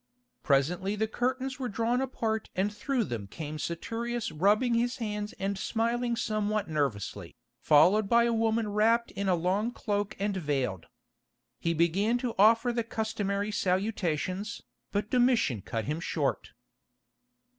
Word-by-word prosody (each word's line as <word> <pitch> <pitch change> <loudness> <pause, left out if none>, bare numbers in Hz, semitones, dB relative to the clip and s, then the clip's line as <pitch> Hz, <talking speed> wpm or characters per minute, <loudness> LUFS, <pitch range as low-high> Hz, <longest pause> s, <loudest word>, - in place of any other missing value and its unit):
Presently 175 +8 +1
the 220 +1 0
curtains 260 +3 -2
were 255 -2 -2
drawn 235 +4 0
apart 220 -4 -2
and 200 +3 0
through 250 +2 -1
them 115 - -5
came 155 +7 -6
Saturius 230 +8 -3
rubbing 205 +10 +3
his 240 +2 +1
hands 210 -3 -3
and 195 0 -3
smiling 235 +3 0
somewhat 215 -2 -1
nervously, 140 - -2 0.3
followed 185 +8 +5
by 235 0 +5
a 235 0 +2
woman 225 -1 +1
wrapped 225 +3 +2
in 200 -1 -2
a 180 - +4
long 185 +6 0
cloak 205 -2 -2
and 200 0 -1
veiled. 135 - -2 0.7
He 170 0 0
began 190 +8 +2
to 245 -1 -3
offer 230 +4 +5
the 235 -1 0
customary 210 -2 -2
salutations, 190 0 -1 0.3
but 205 +1 -2
Domitian 245 - +3
cut 115 +3 -4
him 150 +3 -2
short. 145 -9 -2
210 Hz, 140 wpm, -29 LUFS, 175-230 Hz, 0.7 s, followed